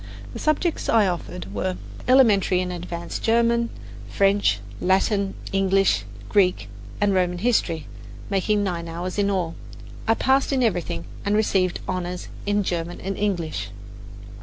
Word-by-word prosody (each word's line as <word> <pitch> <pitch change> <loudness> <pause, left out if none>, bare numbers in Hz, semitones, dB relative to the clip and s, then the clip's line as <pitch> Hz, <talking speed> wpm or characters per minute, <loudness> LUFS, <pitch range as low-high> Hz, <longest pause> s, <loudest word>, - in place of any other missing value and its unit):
The - - -6
subjects 310 +2 0
I 220 -2 +5
offered 100 - -4
were 95 -2 -2 0.3
Elementary 215 -8 +5
and 180 0 -2
Advanced 170 -1 -5
German, 235 +1 +2 0.4
French, 195 - +3 0.2
Latin, 195 - +1 0.2
English, 195 - +2 0.2
and 105 - -15
Greek 180 - +2 0.3
and 205 -1 +3
Roman 180 -1 +1
history, 175 -7 +1 0.4
making 205 +1 +1
nine 170 -3 -2
hours 175 +4 -4
in 200 0 +2
all. 180 -4 -1 0.5
I 225 - +4
passed 265 +4 +2
in 265 -2 +2
everything, 175 - -1 0.2
and 205 +1 +1
received 190 -4 +1
"honours" 180 -1 -3 0.2
in 205 0 +2
German 175 -1 -3
and 195 +1 -3
English. 165 - -2
190 Hz, 135 wpm, -24 LUFS, 175-210 Hz, 0.5 s, I